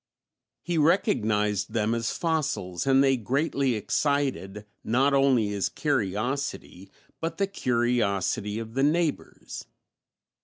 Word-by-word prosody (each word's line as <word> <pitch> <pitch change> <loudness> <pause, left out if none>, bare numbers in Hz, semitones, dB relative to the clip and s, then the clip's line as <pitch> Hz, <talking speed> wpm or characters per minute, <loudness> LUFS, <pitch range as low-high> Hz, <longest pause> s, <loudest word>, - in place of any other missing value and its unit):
He 175 -2 -1
recognized 110 - +1
them 110 0 +1
as 115 -1 -1
fossils 140 - -2
and 135 0 +5
they 135 -1 +3
greatly 135 +2 0
excited, 110 -4 -1 0.2
not 135 +5 +2
only 135 -6 +3
his 100 -2 -1
curiosity, 120 - -2 0.3
but 165 +1 -3
the 200 - +2
curiosity 115 - 0
of 115 0 -6
the 135 - 0
neighbors. 155 +2 -1
125 Hz, 110 wpm, -26 LUFS, 105-145 Hz, 0.3 s, and